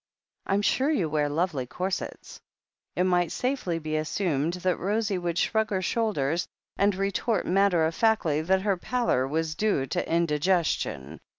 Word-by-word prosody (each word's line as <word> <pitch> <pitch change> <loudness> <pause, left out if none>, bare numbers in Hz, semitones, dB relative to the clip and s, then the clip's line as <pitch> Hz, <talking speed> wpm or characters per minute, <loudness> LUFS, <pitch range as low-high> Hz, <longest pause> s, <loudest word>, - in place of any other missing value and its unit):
I'm 200 +1 +1
sure 265 +7 +2
you 265 - +1
wear 150 -1 +1
lovely 150 -4 -1
corsets," 185 +7 -5 0.5
it 180 - +2
might 175 -2 +2
safely 250 -10 -1
be 155 -1 -2
assumed 155 -1 -1
that 180 0 -1
Rosie 205 0 0
would 175 -1 -2
shrug 220 +2 +1
her 190 -3 -1
shoulders, 175 -7 0 0.3
and 200 0 +2
retort 195 +2 0
matter 185 -3 +3
of 160 - -1
factly 170 -8 +2
that 190 0 +2
her 200 -3 +1
pallor 230 - 0
was 160 +2 -1
due 200 -7 0
to - - -3
indigestion. 155 - 0
180 Hz, 155 wpm, -27 LUFS, 155-200 Hz, 0.5 s, matter